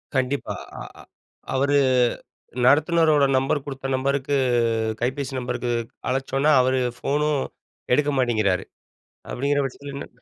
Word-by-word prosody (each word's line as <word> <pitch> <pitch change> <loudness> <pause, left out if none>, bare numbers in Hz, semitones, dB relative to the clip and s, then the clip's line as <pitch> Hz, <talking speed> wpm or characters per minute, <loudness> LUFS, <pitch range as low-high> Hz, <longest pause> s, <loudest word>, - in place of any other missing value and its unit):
கண்டிப்பா, 130 +2 -1 0.3
அ - - -7 0.2
அ - - -10 0.5
அவரு 140 +2 +2 0.9
நடத்துனரோட 155 0 +4
நம்பர் 135 +2 0
குடுத்த 135 -1 -5
நம்பருக்கு 140 +1 0 0.6
கைபேசி 130 +3 -2
நம்பருக்கு 125 -1 -3 0.4
அழைச்சோனா 135 +3 +1
அவுரு 130 0 +2 0.2
ஃபோனும் 150 +1 0 0.5
எடுக்க 145 +1 +1
மாட்டேங்கிறாரு 110 -7 +1 0.7
அப்டிங்கிற 140 +2 0
பட்சத்திலன்ன 140 +1 -7
135 Hz, 100 wpm, -23 LUFS, 130-145 Hz, 0.9 s, நடத்துனரோட